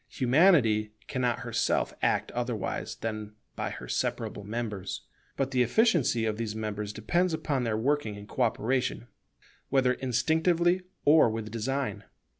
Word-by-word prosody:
Humanity 125 Hz, -, +4 dB
cannot 125 Hz, -3 st, -1 dB
herself -, -, 0 dB
act -, -, +1 dB
otherwise 120 Hz, -4 st, -3 dB
than 110 Hz, -1 st, -5 dB, 0.2 s
by -, -, -2 dB
her -, -, -8 dB
separable 105 Hz, -, -2 dB
members; 105 Hz, -3 st, -4 dB, 0.3 s
but 135 Hz, 0 st, 0 dB
the 130 Hz, -2 st, +2 dB
efficiency 135 Hz, -, +3 dB
of 110 Hz, -1 st, -1 dB
these 110 Hz, -2 st, -3 dB
members 105 Hz, -1 st, -3 dB
depends 165 Hz, -, 0 dB
upon 135 Hz, -5 st, -1 dB
their 110 Hz, -2 st, 0 dB
working 130 Hz, -2 st, 0 dB
in 100 Hz, 0 st, -9 dB
co 130 Hz, -, -5 dB
operation, 120 Hz, +1 st, 0 dB, 0.6 s
whether 130 Hz, -2 st, +3 dB
instinctively 160 Hz, +9 st, +2 dB, 0.2 s
or 150 Hz, -4 st, +6 dB
with 110 Hz, -1 st, -4 dB
design. 115 Hz, -1 st, -2 dB
120 Hz, 135 wpm, -28 LUFS, 110-140 Hz, 0.6 s, or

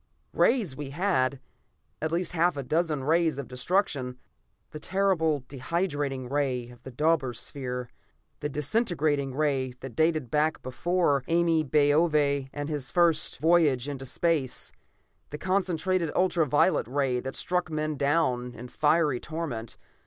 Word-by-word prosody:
Rays 220 Hz, -, +2 dB
we 145 Hz, -1 st, -6 dB
had; 140 Hz, -5 st, 0 dB, 0.6 s
at 155 Hz, +1 st, -1 dB
least 170 Hz, +1 st, 0 dB
half 175 Hz, -2 st, +1 dB
a 140 Hz, -, -3 dB
dozen 155 Hz, 0 st, 0 dB
rays 160 Hz, 0 st, +2 dB
of 140 Hz, -, -5 dB
destruction; 130 Hz, -2 st, -1 dB, 0.5 s
the 150 Hz, -, -7 dB
terrible 160 Hz, -5 st, +1 dB
dehydrating 140 Hz, -1 st, -3 dB
ray 130 Hz, -3 st, -1 dB
of 120 Hz, -, -16 dB
the -, -, -9 dB
Deuber 150 Hz, -2 st, +1 dB
Spheres, 125 Hz, -1 st, -4 dB, 0.5 s
the 150 Hz, -, -3 dB
disintegrating 150 Hz, -, 0 dB
ray 135 Hz, -4 st, 0 dB
that 125 Hz, -1 st, -10 dB
dated 155 Hz, -5 st, +1 dB
back 155 Hz, +1 st, +1 dB
before 145 Hz, +1 st, +1 dB
Ame 165 Hz, -3 st, +2 dB
Baove 145 Hz, -2 st, +3 dB
and 145 Hz, 0 st, -4 dB
his 145 Hz, -4 st, -3 dB
first 170 Hz, -3 st, +2 dB
voyage 150 Hz, -5 st, +3 dB
into 135 Hz, -2 st, -5 dB
space, 155 Hz, -3 st, -1 dB, 0.6 s
the 150 Hz, -, -6 dB
concentrated 185 Hz, -1 st, 0 dB
ultra 180 Hz, -4 st, +2 dB
violet 150 Hz, +2 st, +2 dB
ray 130 Hz, -1 st, 0 dB
that 135 Hz, +2 st, -5 dB
struck 180 Hz, -2 st, -1 dB
men 155 Hz, -1 st, -2 dB
down 130 Hz, -4 st, 0 dB
in 125 Hz, +2 st, -9 dB
fiery 150 Hz, -3 st, +2 dB
torment.... 140 Hz, -9 st, -5 dB
150 Hz, 140 wpm, -27 LUFS, 130-165 Hz, 0.6 s, Baove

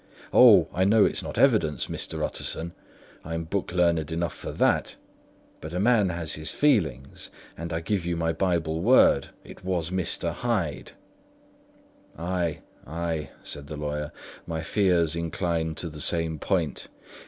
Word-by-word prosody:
O, -, -, +8 dB
I 95 Hz, -, +1 dB
know 105 Hz, +2 st, +5 dB
it's -, -, -1 dB
not -, -, -7 dB
evidence, 75 Hz, -3 st, +3 dB
Mr. -, -, -4 dB
Utterson; 85 Hz, +1 st, -4 dB, 0.5 s
I'm 80 Hz, +1 st, -4 dB
book 90 Hz, +3 st, -3 dB
learned 85 Hz, -3 st, +1 dB
enough 85 Hz, +1 st, -1 dB
for -, -, -7 dB
that; -, -, +1 dB, 0.6 s
but 80 Hz, +3 st, -7 dB
a -, -, 0 dB
man 105 Hz, -2 st, +4 dB
has 85 Hz, -2 st, -3 dB
his 75 Hz, 0 st, -3 dB
feelings, 80 Hz, -, 0 dB, 0.3 s
and 85 Hz, +1 st, -6 dB
I 80 Hz, 0 st, -2 dB
give 95 Hz, +1 st, -1 dB
you 85 Hz, 0 st, -1 dB
my 80 Hz, 0 st, 0 dB
bible 80 Hz, -2 st, 0 dB
word 125 Hz, +8 st, +5 dB
it -, -, -13 dB
was 90 Hz, -3 st, -1 dB
Mr. 95 Hz, -2 st, -1 dB
Hyde!" 105 Hz, -11 st, -2 dB, 1.2 s
"Ay, 85 Hz, -1 st, -2 dB, 0.3 s
ay," 80 Hz, -2 st, -3 dB
said 70 Hz, -1 st, -6 dB
the 75 Hz, -, -6 dB
lawyer. 75 Hz, 0 st, -3 dB, 0.4 s
"My 80 Hz, -2 st, -3 dB
fears 85 Hz, -4 st, +2 dB
incline 85 Hz, -1 st, -2 dB
to 85 Hz, -, -4 dB
the 75 Hz, -2 st, -6 dB
same 80 Hz, -1 st, 0 dB
point. 85 Hz, -7 st, -1 dB
85 Hz, 150 wpm, -26 LUFS, 80-90 Hz, 1.2 s, O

